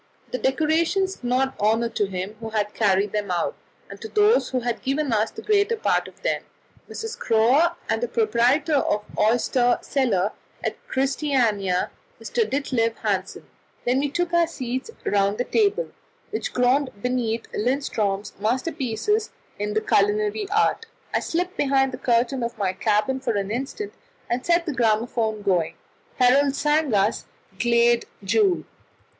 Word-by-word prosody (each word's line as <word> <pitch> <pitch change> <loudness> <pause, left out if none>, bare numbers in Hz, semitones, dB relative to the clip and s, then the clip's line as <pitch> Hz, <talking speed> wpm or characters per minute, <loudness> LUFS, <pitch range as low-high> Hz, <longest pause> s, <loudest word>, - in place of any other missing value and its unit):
The 255 - -2
decorations 330 +7 +1
did 245 -1 -4 0.3
honour 225 +3 +2
to 205 -3 -1
him 190 +1 -4
who 225 -1 -6
had 210 -1 -1
carried 200 -1 +2
them 210 -2 -2
out 175 -2 -1 0.3
and - - -11
to 445 - -5
those 430 +2 +3
who 255 -1 -1
had 240 -1 -2
given 275 -1 0
us 215 0 +2
the - - -10
greater 420 +2 +2
part 445 - +1
of - - -16
them - - 0 0.5
Mrs. 450 +1 -6
Schroer, 260 +10 +3
and 225 0 0
the 240 - 0
proprietor 240 +8 +2
of 210 -6 0
the - - -1
Oyster 245 +3 +3
Cellar 220 -8 +1 0.3
at - - -1
Christiania, 250 -9 +1 0.3
Mr. 460 -3 -1
Ditlev 245 -5 0
Hansen. 195 -3 -2 0.4
Then 250 +2 +2
we 285 +1 0
took 345 +4 -2
our 340 -1 +4
seats 260 - -4 0.2
round 200 0 +2
the 245 - 0
table, 425 - +1 0.4
which 435 - -3
groaned 255 +3 +2
beneath 235 -1 -1
Lindström's 215 -5 -1
masterpieces 265 - -1 0.3
in 210 0 -2
the 215 - +2
culinary 210 - +1
art. 435 +2 +1 0.3
I - - +3
slipped 360 +2 -2
behind 270 -1 +2
the - - -7
curtain 240 +2 +1
of 235 0 -3
my 190 -3 0
cabin 215 +7 +1
for 255 -3 -1
an 200 0 -2
instant, 275 - -4 0.4
and 245 +1 0
set 340 0 +2
the 310 - -2
gramophone 220 -2 0
going. 180 -5 +1 0.4
Herold 270 +2 +4
sang 300 -1 +1
us 200 +3 +1 0.3
"Glade 235 0 +3 0.2
Jul." 360 - +2
245 Hz, 155 wpm, -24 LUFS, 215-295 Hz, 0.5 s, our